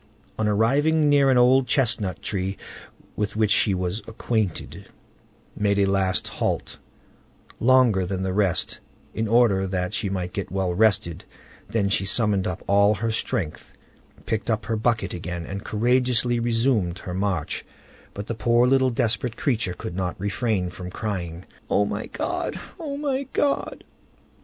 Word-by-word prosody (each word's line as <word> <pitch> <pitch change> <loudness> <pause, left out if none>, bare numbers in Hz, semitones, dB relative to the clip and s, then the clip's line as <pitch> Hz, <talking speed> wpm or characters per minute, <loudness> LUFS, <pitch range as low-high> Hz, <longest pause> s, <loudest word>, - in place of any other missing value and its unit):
On 110 - +1
arriving 145 +9 +3
near 140 -1 +5
an 130 - +4
old 125 +1 +5
chestnut 115 -7 +1
tree 95 -1 -2 0.6
with 105 -1 -2
which 110 -1 +2
she 100 -4 +4
was 90 +4 -2
acquainted, 110 -5 -3 0.7
made 100 -1 +1
a 100 - +4
last 95 -1 0
halt, - - -3 0.8
longer 120 -6 +4
than 95 0 -2
the 95 -1 -1
rest, 95 -3 0 0.3
in 110 0 -1
order 105 -4 +3
that 90 0 -2
she 110 -3 -2
might 90 -2 -3
get 100 - -4
well 95 -2 -1
rested; 90 -4 +2 0.5
then 105 -3 +1
she 100 -1 +1
summoned 105 -3 +1
up 90 - -4
all 100 +1 +4
her 115 +3 -1
strength, 95 -7 -3 0.5
picked 110 +1 -2
up 110 -3 0
her 115 +1 -1
bucket 110 -3 0
again, 85 0 -5
and 100 +1 -6
courageously 120 +1 +1
resumed 115 -6 +1
her 90 - -7
march, 95 -4 -1 0.5
but 100 - -5
the 115 - -3
poor 120 +2 +3
little 130 0 +3
desperate 120 -1 0
creature 110 - 0
could 85 - -6
not 90 -1 -3
refrain 100 -2 -1
from 90 0 -7
crying, 90 -4 -4 0.2
"O 105 - +3
my 105 +1 -4
God! - - -3 0.2
my 280 -3 -2
God!" 285 -1 0
105 Hz, 150 wpm, -24 LUFS, 95-120 Hz, 0.8 s, near